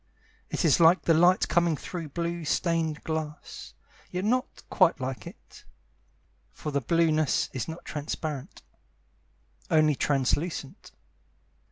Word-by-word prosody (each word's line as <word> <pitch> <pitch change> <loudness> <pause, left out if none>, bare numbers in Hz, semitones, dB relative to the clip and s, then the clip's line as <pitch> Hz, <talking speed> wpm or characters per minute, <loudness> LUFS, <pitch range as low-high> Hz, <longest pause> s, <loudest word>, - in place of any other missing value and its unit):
It - - -1
is 155 - +4
like 170 +2 +6
the 165 - +4
light 175 +3 +4
coming 170 -2 +2
through 165 -1 -6
blue 170 +2 -3
stained 160 -1 0
glass, 155 - -5 0.3
Yet 180 +2 -3
not 250 +4 -1
quite 185 -6 +3
like 130 0 -5
it, - - -14 0.9
For 150 - -6
the 140 0 0
blueness 155 +1 +1
is 130 - -3
not 165 +1 -8
transparent, 150 -2 -5 1.1
Only 155 -1 +4
translucent. 140 +2 -1
160 Hz, 120 wpm, -27 LUFS, 150-170 Hz, 1.1 s, like